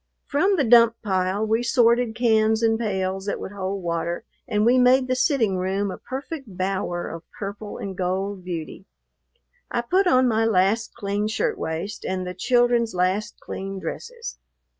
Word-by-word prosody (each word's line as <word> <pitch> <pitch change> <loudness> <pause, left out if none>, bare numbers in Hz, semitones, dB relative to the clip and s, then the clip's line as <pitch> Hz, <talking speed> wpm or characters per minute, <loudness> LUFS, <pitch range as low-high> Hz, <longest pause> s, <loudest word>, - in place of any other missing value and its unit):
From 375 +8 +2
the 305 - +2
dump 230 -1 +6
pile 190 +1 0
we 220 +2 +1
sorted 235 -1 +3
cans 220 -1 +3
and 225 0 +3
pails 190 -3 -2
that - - -2
would - - -6
hold 195 -1 -4
water, 170 +2 -2 0.2
and 210 -3 +1
we 250 +2 +5
made 255 +1 +5
the 255 - +1
sitting 250 - +2
room 190 +2 -1
a - - -8
perfect 265 - -7
bower 185 -2 -2
of 165 - -7 0.2
purple 205 +1 -6
and 195 -1 -5
gold 190 +1 -2
beauty. 175 +2 -6 0.8
I 240 - 0
put 370 +11 +2
on 255 -6 +4
my 225 -1 +2
last 220 +1 +2
clean 205 +1 -1
shirt 445 - 0
waist 165 +6 -4
and 185 -1 -2
the 180 - -4
children's 240 +1 +2
last 185 +4 0
clean 195 0 -6
dresses. 465 - -6
215 Hz, 165 wpm, -24 LUFS, 190-240 Hz, 0.8 s, dump